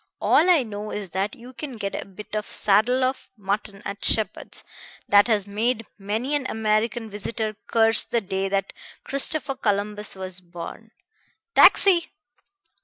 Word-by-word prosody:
All 345 - +4
I 335 -7 +5
know 210 -2 -6
is 200 -5 -5
that 195 +3 -2
you 245 +2 -12
can 265 -2 -7
get 200 -2 -3
a - - -4
bit 210 +2 -9
of 210 - -2
saddle 220 +6 +2
of 260 +1 -1
mutton 200 0 -3
at 200 +1 -5
Sheppard's 215 -3 0 0.4
that 205 +1 +6
has 210 -4 +2
made 225 +3 -1
many 220 +8 -2
an 285 -3 0
American 220 +1 0
visitor 215 +1 -3
curse 225 0 +4
the 235 - 0
day 195 -1 -2
that 195 0 -1 0.3
Christopher 280 +1 -1
Columbus 210 -4 -2
was 185 -1 -7
born.... 175 +5 -9 0.6
Taxi!" 360 -4 +6
215 Hz, 150 wpm, -24 LUFS, 200-240 Hz, 0.6 s, that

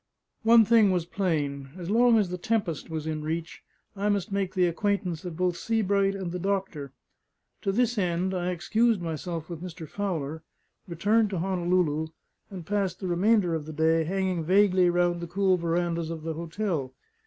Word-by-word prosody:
One 225 0 +6
thing 225 -2 +5
was 180 -3 0
plain: 150 -8 -2
as 180 +1 -5
long 235 +1 +5
as 205 -4 +1
the 180 - -3
Tempest 190 -7 -1
was 160 -1 -4
in 155 -1 -3
reach, 160 +1 -4 0.3
I 205 +1 -1
must 200 -2 -1
make 195 -1 -2
the 180 -1 +4
acquaintance 180 -1 -1
of 170 -3 -6
both 180 -1 +1
Sebright 200 -1 +1
and 190 -3 -4
the 180 - -4
doctor. 190 -7 -2 0.7
To 195 - 0
this 240 +1 +1
end, 180 0 0
I 180 -1 -1
excused 215 +5 +1
myself 165 -1 -4
with 170 -2 -7
Mr. 170 -3 -7
Fowler, 160 -5 -3 0.5
returned 205 +6 +2
to 190 - -3
Honolulu, 175 -3 0 0.4
and 185 -4 -8
passed 195 -2 -1
the 190 - -4
remainder 180 +1 +2
of 155 -2 -3
the 155 - -6
day 160 +1 +2
hanging 185 0 -1
vainly 185 0 +4
round 175 0 +1
the 170 - -5
cool 190 +2 +2
verandahs 170 -1 -1
of 165 -2 -6
the 160 0 -3
hotel. 165 -5 -3
180 Hz, 175 wpm, -27 LUFS, 165-200 Hz, 0.7 s, One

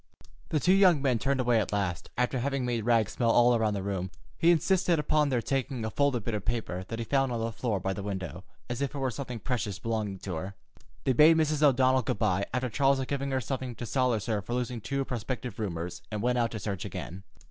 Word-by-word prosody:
The 155 - +1
two 180 +5 +4
young 185 -5 +6
men 130 -4 +1
turned 140 +1 0
away 120 -2 +3
at 95 - -4
last, 95 -4 -2
after 125 +1 +1
having 135 0 -1
made 120 -3 -1
Rags 115 -3 +3
smell 120 -2 0
all 120 +1 +5
around 110 -2 +1
the 100 - -3
room. 95 -2 -2 0.3
He 165 - +3
insisted 175 +1 +3
upon 150 0 +2
their 125 -3 0
taking 130 -1 -2
a 110 - -3
folded 140 -5 +1
bit 115 - -3
of 105 -2 -2
paper 105 -6 -2
that 115 - -5
he 115 - -3
found 135 +1 +1
on 120 - -2
the 115 +1 -2
floor 110 -2 -2
by 95 +1 -2
the 100 - -5
window, 95 -2 -5 0.2
as 120 +1 -4
if 140 +1 -2
it - - -3
were 135 -2 -1
something 125 +1 -5
precious 115 -4 -2
belonging 110 -3 -2
to 95 0 -6
her. 95 +4 -5 0.5
They 130 - +2
bade 155 +6 +7
Mrs. 155 -2 +1
O'Donnell 130 -2 +4
good 110 - -2
by, 100 -2 +1
after 130 +1 -1
Charles 135 +3 +2
had 130 -1 -3
given 140 -1 -1
her 135 -1 0
something 130 -1 -4
to 120 - -6
solace 125 -4 +1
her 110 -3 0
for 120 +6 -4
losing 125 -1 -2
two 140 +4 -2
prospective 125 -1 -4
roomers, 90 -3 -4
and 105 0 -3
went 125 0 +2
out 115 -1 +2
to 110 - -5
search 100 -3 -3
again. 95 +3 -6
120 Hz, 245 wpm, -29 LUFS, 105-135 Hz, 0.5 s, bade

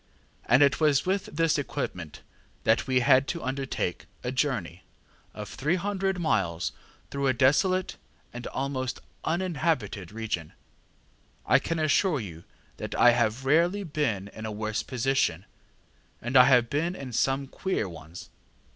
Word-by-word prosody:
And 125 +5 +6
it 140 - +3
was 150 -3 +3
with 190 +1 0
this 165 -1 +1
equipment 90 - -5 0.4
that - - +2
we 130 -1 +3
had 130 +1 +5
to 170 - -3
undertake 130 -8 -3 0.2
a 125 - -2
journey 120 - -1 0.5
of 105 -1 -6
300 190 - -1
miles 95 - 0 0.4
through 140 -1 -1
a 130 - +3
desolate 180 +9 +2 0.4
and 120 0 -6
almost 130 -1 -3 0.2
uninhabited 160 - -1
region. 105 -8 -4 0.9
I - - +5
can 165 - -3
assure 155 +1 +2
you 85 -7 -8 0.3
that - - -5
I 120 - +7
have 120 +2 0
rarely 170 +8 +3
been 140 - -1
in 110 +1 -7
a - - -4
worse 110 +1 -2
position, 125 - 0 0.7
and 120 +3 -5
I 125 -1 +9
have 125 -3 +5
been 165 +7 -1
in 130 -6 -7
some 135 +3 +1
queer 185 - -2
ones. 85 0 -11
135 Hz, 140 wpm, -27 LUFS, 110-155 Hz, 0.9 s, I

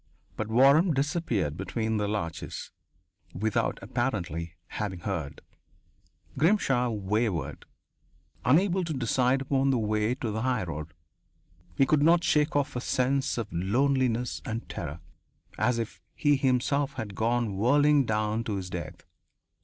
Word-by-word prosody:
But 110 - -3
Waram 140 - +5
disappeared 135 - 0
between 110 +4 -2
the 105 -1 0
larches, 100 -6 -4 0.6
without, 110 +2 0
apparently, 85 -9 -2
having 95 -5 -4
heard. 80 -8 -4 1.0
Grimshaw 140 - +3
wavered, 100 - -2 0.8
unable 180 +7 +3
to 165 -2 -3
decide 130 +1 +1
upon 135 0 +1
the 135 - +3
way 110 +1 0
to 115 -4 -3
the 110 +1 -2
highroad. 85 - -2 0.8
He 135 - +5
could 150 +2 +3
not 170 +3 +5
shake 150 -2 +2
off 145 -1 0
a 125 - -2
sense 130 +2 0
of 115 -6 -4
loneliness 125 +6 +1
and 115 +2 -4
terror, 85 0 -6 0.6
as 125 -1 +2
if 100 -7 -5
he 145 -2 +3
himself 135 +2 +1
had 105 -6 -5
gone 115 0 0
whirling 145 +6 +4
down 110 +1 0
to 105 - -2
his 90 -2 -5
death. 85 -1 -6
115 Hz, 130 wpm, -28 LUFS, 100-135 Hz, 1.0 s, Waram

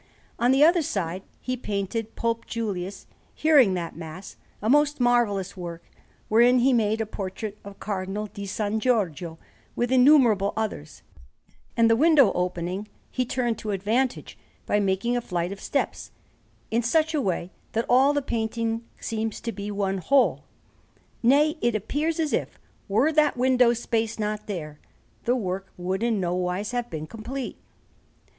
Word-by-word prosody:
On 245 +2 +4
the 270 +2 +5
other 340 +2 +5
side 185 - -2 0.2
he 255 - -2
painted 215 -1 -3
Pope 230 0 -2
Julius 200 -4 -4 0.3
hearing 275 -11 +5
that 170 -2 -4
Mass, 165 +3 -9 0.2
a 215 - -3
most 295 +3 +3
marvellous 225 -6 +2
work, 170 -2 -7 0.4
wherein 240 +3 +5
he 255 +2 +4
made 220 -1 +2
a - - 0
portrait 205 +1 -6
of 200 0 -11
Cardinal 200 +1 -3
di 200 -1 -8
San 210 +2 -1
Giorgio, 180 - 0 0.4
with 240 +1 -1
innumerable 250 -7 +5
others; 215 - -4 0.7
and 230 -1 +5
the 225 - +5
window 290 -4 +5
opening 180 +3 -2 0.2
he 255 - 0
turned 240 -2 -1
to 215 - -5
advantage 220 +6 -1 0.3
by 205 - +2
making 200 +4 0
a 245 - 0
flight 175 -4 -2
of 200 - -7
steps, 280 - -2 0.6
in 230 +2 +2
such 315 +7 +2
a 300 - +1
way 185 -4 -2 0.2
that 230 +1 0
all 265 +3 +5
the 290 -1 0
painting 230 -1 -2 0.2
seems 220 -1 -3
to 230 - -4
be 200 0 -6
one 195 -2 -1
whole: 275 +9 +2 0.8
nay, 295 +6 +4
it 240 -2 +1
appears 300 - -1
as 315 -2 0
if, - - -2 0.3
were 230 +10 +3
that 300 -3 +3
window 250 -1 +4
space 230 -1 -1
not 210 -1 -3
there, 155 -7 -5 0.5
the 245 - +3
work 190 -4 -3
would 185 +2 -2
in 230 -3 +1
nowise 180 +3 -1
have 245 -1 -2
been 155 -1 -5
complete. 235 +8 -6
220 Hz, 155 wpm, -25 LUFS, 195-250 Hz, 0.8 s, the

